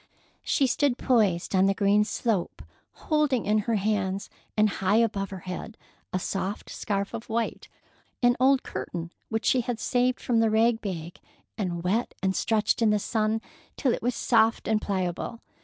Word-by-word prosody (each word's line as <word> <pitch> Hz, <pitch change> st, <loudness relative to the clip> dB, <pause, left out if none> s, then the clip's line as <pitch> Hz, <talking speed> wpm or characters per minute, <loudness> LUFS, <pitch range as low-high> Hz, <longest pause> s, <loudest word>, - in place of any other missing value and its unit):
She 275 Hz, -, +2 dB
stood 265 Hz, 0 st, +1 dB
poised 205 Hz, -12 st, +2 dB
on 190 Hz, 0 st, +4 dB
the 195 Hz, -, +2 dB
green 205 Hz, +1 st, +3 dB
slope, 215 Hz, -4 st, -2 dB, 0.3 s
holding 300 Hz, -6 st, 0 dB
in 215 Hz, +1 st, +3 dB
her 225 Hz, +2 st, 0 dB
hands 200 Hz, -2 st, -1 dB, 0.3 s
and 215 Hz, 0 st, +5 dB
high 200 Hz, 0 st, 0 dB
above 205 Hz, -4 st, +1 dB
her 190 Hz, -2 st, -7 dB
head 185 Hz, +5 st, -6 dB, 0.3 s
a -, -, 0 dB
soft 195 Hz, +2 st, -3 dB
scarf 200 Hz, -1 st, -2 dB
of 230 Hz, 0 st, -6 dB
white—an 235 Hz, +1 st, -2 dB
old 265 Hz, +1 st, +4 dB
curtain 170 Hz, -1 st, -5 dB, 0.2 s
which 220 Hz, 0 st, -2 dB
she 255 Hz, -, +3 dB
had 235 Hz, -1 st, -3 dB
saved 250 Hz, +3 st, +1 dB
from 235 Hz, -2 st, +1 dB
the 225 Hz, -1 st, +3 dB
rag 225 Hz, +1 st, +3 dB
bag 170 Hz, -4 st, -5 dB, 0.4 s
and 175 Hz, -5 st, -3 dB
wet 210 Hz, +7 st, 0 dB
and 190 Hz, 0 st, +1 dB
stretched 220 Hz, +1 st, +1 dB
in 225 Hz, -, +4 dB
the 210 Hz, -, +3 dB
sun 220 Hz, +1 st, 0 dB, 0.4 s
till 255 Hz, -4 st, +2 dB
it -, -, -3 dB
was 245 Hz, +1 st, 0 dB
soft 225 Hz, -1 st, +2 dB
and 220 Hz, -1 st, +2 dB
pliable. 190 Hz, +3 st, -2 dB
215 Hz, 170 wpm, -27 LUFS, 195-235 Hz, 0.4 s, and